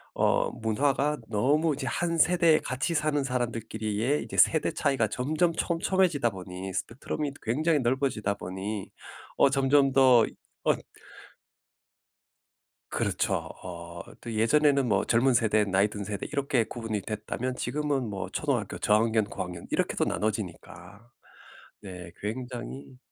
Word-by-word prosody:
어 - - +2
문화가 135 +6 0
너무 145 +9 +2
이제 135 -1 -5
한 170 +6 -1
세대에 165 -1 +5
같이 135 +6 -2
사는 150 -2 +1
사람들끼리의 115 0 -1
이제 - - -8
세대 160 - +4
차이가 135 -7 +1
점점 155 - 0
촘촘해지다 170 - +1
보니 95 0 -7
스펙트럼이 135 +7 -3
굉장히 155 +8 +2
넓어지다 120 -5 0
보니 95 +2 -5 0.5
어 140 - +6
점점 135 0 +4
더 130 -3 +6
이 - - -12 0.3
언 - - +3 2.1
그렇죠. - - 0 0.3
어 90 -2 -6 0.4
또 120 - -6
예전에는 140 +4 +3
뭐 100 -2 +2
젊은 125 +3 +3
세대, 110 -3 +3
나이 100 +1 +2
든 105 0 -6
세대 100 -1 -4
이렇게 140 -4 +1
구분이 110 -2 -4
됐다면 110 +5 -4
지금은 145 -4 -1
뭐 100 -2 -4
초등학교 - - -2
저학년, 110 0 +2
고학년 90 -4 -6
이렇게도 - - 0
나눠지니까. 105 +1 -4 0.7
네 90 -4 -9
굉장히 125 +3 -6
120 Hz, 295 characters per minute, -28 LUFS, 105-140 Hz, 2.1 s, 어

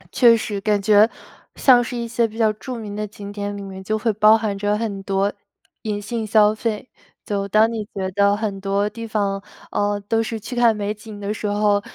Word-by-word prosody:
确 235 -3 +6
实， 205 -2 -4
感 210 0 +1
觉 210 +2 +5 0.5
像 245 -3 +5
是 245 +1 -5
一 235 0 -3
些 230 0 +1
比 220 0 -12
较 220 -2 +3
著 250 +4 -7
名 215 -3 -6
的 210 0 -2
景 205 0 -9
点， 205 0 -4
里 200 - -7
面 190 -1 -8
就 215 +3 -1
会 220 +1 0
包 215 +1 +6
含 215 -2 -2
着 205 +1 0
很 210 -3 -3
多 195 +1 0 0.5
隐 210 -2 -3
性 220 +2 -4
消 215 0 +4
费。 220 +1 -3 0.4
就 200 -1 -2
当 215 +3 +4
你 225 -2 -3
觉 190 -1 -2
得 200 +1 +3
很 205 -3 -3
多 200 +1 0
地 230 +2 -7
方， 200 -2 -1 0.3
呃， 205 0 0
都 225 +1 +2
是 225 0 -3
去 245 +4 -7
看 235 -2 +4
美 205 0 -2
景 210 0 -11
的 205 +1 -3
时 215 - -4
候， 205 0 +2
210 Hz, 235 characters per minute, -21 LUFS, 200-225 Hz, 0.5 s, 确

